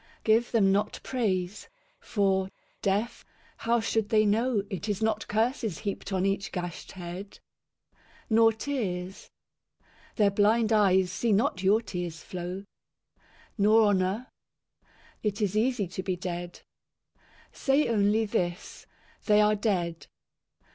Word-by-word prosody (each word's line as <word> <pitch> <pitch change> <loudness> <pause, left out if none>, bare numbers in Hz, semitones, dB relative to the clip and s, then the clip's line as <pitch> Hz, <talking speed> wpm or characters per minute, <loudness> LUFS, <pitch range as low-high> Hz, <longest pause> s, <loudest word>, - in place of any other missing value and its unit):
Give 225 +2 +3
them 200 -5 +4
not 200 +2 0
praise. 200 -6 -2 0.3
For, 195 -2 0 0.3
deaf, 205 +5 -1 0.3
how 235 +1 +1
should 225 -1 -1
they 215 -2 +4
know 220 +1 +1
It 200 +3 -5
is 205 -1 -1
not 220 -1 -1
curses 220 - 0
heaped 200 0 -5
on 190 0 0
each 195 0 -1
gashed 175 -2 -6
head? 185 +2 -8 0.9
Nor 225 0 +5
tears. 200 -7 -4 0.9
Their 205 -2 +3
blind 215 +3 +3
eyes 190 -3 +4
see 235 - 0
not 210 -2 +1
your 200 +4 +4
tears 175 -5 -5
flow. 180 +2 -6 0.9
Nor 215 +2 +5
honour. 195 +5 0 0.9
It 210 -2 -2
is 205 -2 0
easy 225 -1 +1
to 190 - -5
be 185 -1 -2
dead. 175 -1 -6 0.9
Say 275 +2 +1
only 215 0 +2
this, 175 -2 -3 0.2
" - - -31
They 210 -1 +5
are 210 0 +4
dead." 180 -6 -1
205 Hz, 125 wpm, -28 LUFS, 185-220 Hz, 0.9 s, Nor